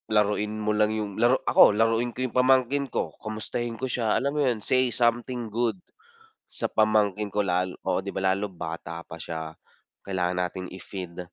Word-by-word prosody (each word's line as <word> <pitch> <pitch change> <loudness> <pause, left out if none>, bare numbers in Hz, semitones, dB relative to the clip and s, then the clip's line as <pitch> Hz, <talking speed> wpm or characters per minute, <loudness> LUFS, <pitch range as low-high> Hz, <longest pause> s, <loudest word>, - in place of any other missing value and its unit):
laruin 105 0 +1
mo 105 0 0
lang 105 0 +3
yung 105 -1 -4
laro 120 +2 +5
ako 105 - +6
laruin 115 +2 +2
ko 130 - -1
yung 125 - -5
pamangkin 130 +2 +3
ko, - - -2
kumustahin 115 +2 -4
ko 130 - -3
siya. 120 -4 0
Alam 140 +1 0
mo - - +3
yun 120 -4 0
say 130 -1 +3
something 120 0 0
good, 120 - 0 0.7
sa - - -2
pamangkin 105 -1 +2
ko 105 +1 0
lal 90 0 0
oo, 95 -1 +1
di 100 +1 -7
ba, - - -2
lalo 100 +2 -1
bata 85 -2 -6
pa 80 - -10
siya. 80 -1 -5 0.5
Kailangan 90 -2 -1
natin 90 +1 -2
i-feed 95 -1 -8
105 Hz, 180 wpm, -26 LUFS, 95-120 Hz, 0.7 s, ako